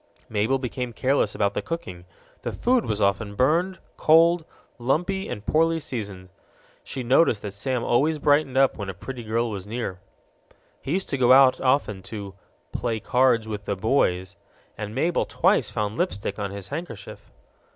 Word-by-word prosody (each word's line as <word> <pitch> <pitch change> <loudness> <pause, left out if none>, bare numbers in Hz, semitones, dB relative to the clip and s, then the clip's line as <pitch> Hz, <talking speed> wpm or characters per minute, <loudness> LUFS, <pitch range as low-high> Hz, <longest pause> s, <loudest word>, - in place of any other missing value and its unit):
Mabel 110 +5 +1
became 125 -1 -4
careless 135 +4 +1
about 100 -1 +1
the - - -2
cooking: 90 - -6 0.4
the - - -3
food 245 -1 +1
was 105 -1 0
often 100 +1 0
burned, 170 - +2 0.2
cold, 165 +1 +5 0.3
lumpy, 175 +10 0
and 105 - -6
poorly 165 +1 +2
seasoned. 100 -10 -6 0.5
She 130 - -5
noticed 120 -3 +3
that 100 -2 -5
Sam 125 +4 -2
always 150 +6 +2
brightened 145 -2 +2
up 135 -1 +4
when 100 -1 -4
a 95 - -5
pretty 125 +5 -7
girl 115 +1 -1
was 100 -1 -6
near. 110 -5 -4 0.8
He 140 - -3
used 190 +1 -2
to 135 - -2
go 125 0 +6
out 130 -1 +6
often 130 -7 +1
"to 100 0 -7 0.4
play 115 -2 -2
cards 125 -2 +2
with 105 -2 -5
the 100 - -1
boys," 95 -4 0 0.4
and 105 +1 -6
Mabel 165 +6 +1
twice - - +2
found 105 +1 -3
lipstick 100 - -2
on 100 -1 -2
his 100 -1 -7
handkerchief. 140 - -7
120 Hz, 165 wpm, -25 LUFS, 100-145 Hz, 0.8 s, go